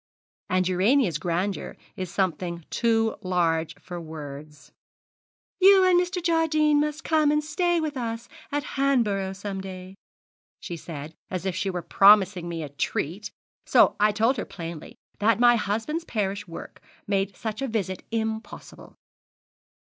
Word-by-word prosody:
And 185 0 +2
Urania's 185 - +2
grandeur 180 +4 -2 0.2
is 185 -3 -5
something 175 -2 -2
too 225 -1 +1
large 170 -4 0
for 175 -1 -7
words. 150 -2 -9 0.9
"You 385 0 +7
and 360 -1 +5
Mr. 360 0 -3
Jardine 310 -3 +3
must 300 +1 -1
come 310 -2 +3
and 300 0 +2
stay 345 +3 +1
with 310 -2 -3
us 230 -2 -4 0.2
at 290 0 -1
Hanborough 220 -9 +1
some 195 0 -5
day," 185 -1 -8 0.7
she 175 - -6
said, 155 -2 -8 0.2
as 185 0 -4
if 190 -2 -1
she 190 +1 -1
were 180 -2 -3
promising 195 -3 +5
me 165 -2 -4
a 150 - -6
treat; 155 +7 -3 0.4
so - - +5
I 210 +1 +4
told 225 +5 +2
her - - -3
plainly 165 -3 -8 0.2
that 220 +2 +3
my 240 0 +6
husband's 225 - -2
parish 205 - -2
work 165 - -10 0.2
made 195 -1 -1
such 220 +2 -4
a 270 - -1
visit 195 -6 -3
impossible. 220 -1 -5
205 Hz, 145 wpm, -25 LUFS, 180-270 Hz, 0.9 s, You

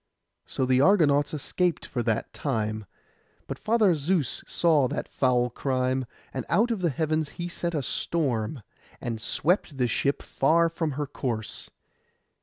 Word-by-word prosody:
So 130 - -1
the 130 0 +3
Argonauts 145 -6 +4
escaped 170 +3 -1
for 120 - -3
that 115 -1 -1
time: 110 -6 -2 0.6
but - - -6
Father 215 -4 +3
Zeus 155 -2 0
saw 155 -6 +3
that - - -4
foul 125 -2 +1
crime; 130 0 -1 0.3
and 130 - -3
out 220 +7 +3
of 220 -5 -1
the 175 - +2
heavens 155 +1 0
he 175 - -3
sent 170 -1 -3
a 145 - -1
storm, 125 -6 -1 0.4
and 115 -2 -4
swept 160 - 0
the 125 -2 +2
ship 140 +4 0
far 165 +4 +3
from 165 -2 -2
her 145 +2 -2
course. 120 -6 -4
145 Hz, 150 wpm, -27 LUFS, 125-170 Hz, 0.6 s, Argonauts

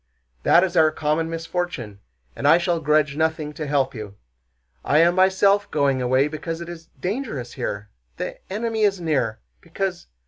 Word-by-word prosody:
That 175 - +5
is 185 -1 -1
our 160 -2 +6
common 155 +1 -1
misfortune, 165 - -4 0.4
and - - -1
I 165 - +7
shall 175 -1 0
grudge 150 -1 +2
nothing 155 -1 -1
to 150 0 -5
help 140 -2 +1
you. 105 -4 -8 0.7
I 145 - +2
am 170 +2 +5
myself 190 +2 +3
going 140 -3 +1
away 130 +3 +3
because 160 +2 -5
it 170 0 -7
is 165 -1 -10
dangerous 185 - -4
here... 105 +1 -5 0.3
the - - -5
enemy 220 +2 -2
is 200 -3 +2
near... 135 -10 -1 0.2
because... 175 +1 -4
160 Hz, 165 wpm, -23 LUFS, 140-180 Hz, 0.7 s, I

